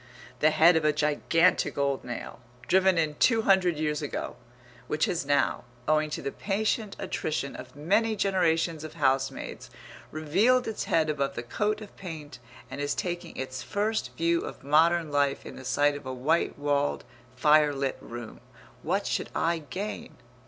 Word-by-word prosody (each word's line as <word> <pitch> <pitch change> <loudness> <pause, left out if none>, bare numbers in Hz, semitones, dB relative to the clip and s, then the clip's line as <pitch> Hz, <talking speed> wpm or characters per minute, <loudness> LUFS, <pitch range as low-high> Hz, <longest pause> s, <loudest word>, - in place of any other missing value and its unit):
the 155 - +5
head 165 +3 +5
of 160 - +2
a 155 - +4
gigantic 150 +4 +2
old 140 -1 0
nail, 120 - -7 0.3
driven 190 -1 +4
in 155 -2 +1
two 225 -2 +3
hundred 185 -5 +3
years 150 -1 -1
ago, 145 - -4 0.5
which 155 +1 +1
has 165 -5 -2
now, 145 0 +2 0.2
owing 155 0 +2
to - - -5
the 140 - -2
patient 210 +1 -1
attrition 155 -7 -3
of 125 +1 -10
many 205 +9 +1
generations 170 -5 +1
of 155 0 -8
housemaids, 135 -3 -1 0.4
revealed 195 +12 +2
its 220 - -3
head 160 -2 +2
above 140 -3 -1
the 120 - -4
coat 210 - -1
of 205 - -11
paint, 155 -7 -8 0.3
and 140 - -5
is 145 0 -1
taking 175 -1 -4
its 130 -1 -4
first 205 - -1
view 170 0 +2
of - - -8
modern 160 +2 +3
life 140 -1 +1
in - - -8
the 130 - -10
sight 145 +3 +2
of 145 - -8
a - - -3
white 140 +7 0
walled 145 0 0 0.3
fire 150 +2 +5
lit 135 -1 -2
room, 120 -1 -8 0.4
what - - -1
should - - -2
I 170 0 +1
gain? 200 +9 -5
155 Hz, 165 wpm, -28 LUFS, 145-180 Hz, 0.5 s, the